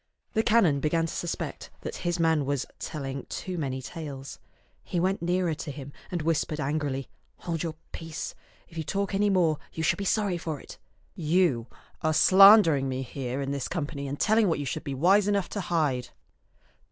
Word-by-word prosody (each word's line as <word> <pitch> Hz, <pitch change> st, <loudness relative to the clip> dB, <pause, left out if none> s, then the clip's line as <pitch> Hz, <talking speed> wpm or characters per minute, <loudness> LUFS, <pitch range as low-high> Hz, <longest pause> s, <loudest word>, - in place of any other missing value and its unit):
The 220 Hz, -, +3 dB
canon 215 Hz, -11 st, +4 dB
began 165 Hz, +3 st, +1 dB
to 165 Hz, -, -5 dB
suspect 175 Hz, -, -4 dB
that -, -, -5 dB
his 175 Hz, 0 st, -2 dB
man 160 Hz, -2 st, +3 dB
was 140 Hz, -1 st, -1 dB
telling 135 Hz, -3 st, -5 dB
too 185 Hz, -1 st, -4 dB
many 130 Hz, -5 st, -3 dB
tales. 140 Hz, -4 st, -7 dB, 0.4 s
He 175 Hz, -, -2 dB
went 190 Hz, +3 st, +1 dB
nearer 175 Hz, -1 st, +1 dB
to 155 Hz, 0 st, -6 dB
him 140 Hz, 0 st, -9 dB, 0.2 s
and 175 Hz, -3 st, -2 dB
whispered 160 Hz, -1 st, 0 dB
angrily, 140 Hz, -2 st, -1 dB, 0.2 s
" -, -, -41 dB
Hold 165 Hz, -2 st, -2 dB
your 165 Hz, -2 st, -3 dB, 0.2 s
peace. 165 Hz, -1 st, -5 dB, 0.3 s
If 165 Hz, -1 st, -8 dB
you -, -, -1 dB
talk 200 Hz, +5 st, -2 dB
any 205 Hz, +1 st, +2 dB
more, 170 Hz, -6 st, +2 dB
you 160 Hz, -, -4 dB
shall -, -, +2 dB
be 200 Hz, -, -3 dB
sorry 195 Hz, -3 st, +1 dB
for 160 Hz, -3 st, -4 dB
it. -, -, -12 dB, 0.3 s
You 160 Hz, -, +1 dB, 0.3 s
are 155 Hz, -, +1 dB
slandering 190 Hz, -8 st, +7 dB
me 130 Hz, 0 st, -2 dB
here 130 Hz, +1 st, -4 dB
in 140 Hz, 0 st, -2 dB
this 140 Hz, -2 st, -2 dB
company 145 Hz, -3 st, -4 dB
and 140 Hz, +1 st, -5 dB
telling 220 Hz, 0 st, +4 dB
what 165 Hz, -, +1 dB
you 145 Hz, -, -3 dB
should 150 Hz, +4 st, -3 dB
be 140 Hz, -2 st, -4 dB
wise 190 Hz, +8 st, +4 dB
enough 200 Hz, -2 st, +1 dB
to 205 Hz, -, -3 dB
hide." 150 Hz, -8 st, 0 dB
160 Hz, 190 wpm, -27 LUFS, 140-180 Hz, 0.4 s, slandering